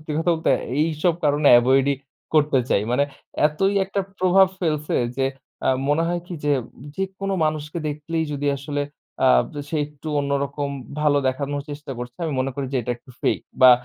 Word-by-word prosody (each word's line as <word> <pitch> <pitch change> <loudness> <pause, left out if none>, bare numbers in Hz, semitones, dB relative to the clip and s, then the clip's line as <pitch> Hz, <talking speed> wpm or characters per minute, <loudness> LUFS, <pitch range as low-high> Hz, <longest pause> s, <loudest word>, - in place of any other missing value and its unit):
সত্যি 155 0 -6
কথা 165 +2 +2 0.2
তে - - +6 0.3
এইসব 160 +1 +1
কারণে 145 0 +4
avoid 130 +2 +3
ই - - 0 0.4
করতে 150 -3 +4
চাই। 100 - +2
মানে 140 +3 +3 0.4
এতই 195 +6 0
একটা 195 +1 -2 0.2
প্রভাব 185 +1 +5
ফেলছে 155 -3 0 0.2
যে 135 0 +2 0.4
আ - - +3 0.2
মনে 150 +3 +3
হয় 175 0 -1
কি 180 - -6
যে, 145 - +3 0.4
যে 195 - -2 0.2
কোনো 195 0 -1
মানুষকে 155 +1 -2
দেখলেই 160 +2 -2
যদি 145 0 -2
আসলে 145 +1 -2 0.5
আব - - +5 0.2
সে 160 - -2
একটু 150 +1 -10
অন্যরকম 140 0 -1 0.3
ভালো 150 -1 +4
দেখানোর 140 +2 -2
চেষ্টা 145 -1 -6
করছে। 125 +1 -7
আমি 155 - -1
মনে 130 +1 0
করি 140 0 -3
যে - - +1
এটা 120 - -3
একটু 120 - -18
fake, - - +1 0.2
বা 130 - +11
145 Hz, 180 wpm, -23 LUFS, 140-160 Hz, 0.5 s, বা